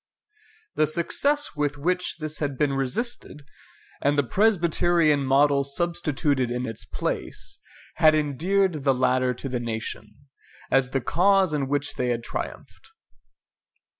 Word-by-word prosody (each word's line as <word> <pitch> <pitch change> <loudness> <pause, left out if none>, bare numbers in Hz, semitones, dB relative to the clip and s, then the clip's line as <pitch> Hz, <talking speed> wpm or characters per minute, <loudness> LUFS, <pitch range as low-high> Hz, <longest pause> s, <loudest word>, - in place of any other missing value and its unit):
The 155 - +2
success 285 - 0
with 145 -1 -1
which 180 +5 -1
this 155 -1 -4
had 145 -3 -2
been 145 -2 +1
resisted, 145 - -3 0.6
and 145 +1 +2
the 145 - +4
Presbyterian 170 - +2
model 140 +1 +3
substituted 145 -3 -1
in 125 +1 -2
its 115 -3 -6
place, - - -4 0.4
had 155 -1 +6
endeared 160 +3 0
the 135 -1 +3
latter 130 0 +1
to 135 - -6
the 125 -2 -2
nation, 110 -2 -5 0.6
as 135 -1 +3
the 135 0 -1
cause 190 +5 +3
in 140 -3 -1
which 145 +1 -1
they 125 - 0
had 120 -1 -1
triumphed. - - -7
145 Hz, 135 wpm, -25 LUFS, 130-170 Hz, 0.6 s, had